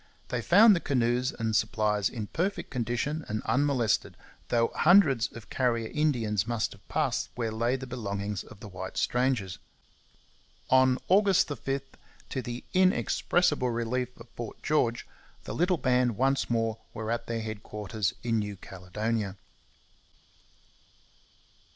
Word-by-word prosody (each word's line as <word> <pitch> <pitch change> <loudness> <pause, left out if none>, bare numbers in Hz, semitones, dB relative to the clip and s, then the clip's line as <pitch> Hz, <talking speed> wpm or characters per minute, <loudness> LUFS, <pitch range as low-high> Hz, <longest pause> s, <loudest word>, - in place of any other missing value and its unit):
They 125 - -1
found 205 - +7
the - - 0
canoes 125 -2 +1
and 110 -4 -2
supplies 105 -2 +1
in 110 -4 -5
perfect 185 - -2
condition 125 +5 -2
and 110 +1 -3
unmolested, 130 -5 +1 0.3
though 115 -1 +2
hundreds 155 - +5
of 115 - -12
Carrier 115 -3 0
Indians 115 -9 +1
must 115 -2 -1
have 100 0 -16
passed - - 0
where 115 -2 -2
lay 115 +3 0
the 130 0 -5
belongings 100 -5 -4
of 105 - -15
the - - -8
white 95 -1 -7
strangers. 125 -7 0 1.1
On 130 0 +5
August 195 -2 +4
5, 135 -1 -2 0.5
to 130 - -2
the 120 0 -6
inexpressible 180 -6 +2
relief 120 +2 -1
of 115 - -12
Fort 120 -2 -8
George, 120 -6 +1 0.4
the - - -6
little 180 +1 +2
band 125 -5 +2
once 135 +1 +1
more 115 -1 0 0.2
were 110 0 -3
at 120 - -2
their 115 -1 -2
headquarters 105 -2 -3
in 115 -2 +1
New 105 -1 -3
Caledonia. 100 +3 -4
120 Hz, 135 wpm, -28 LUFS, 110-135 Hz, 1.1 s, found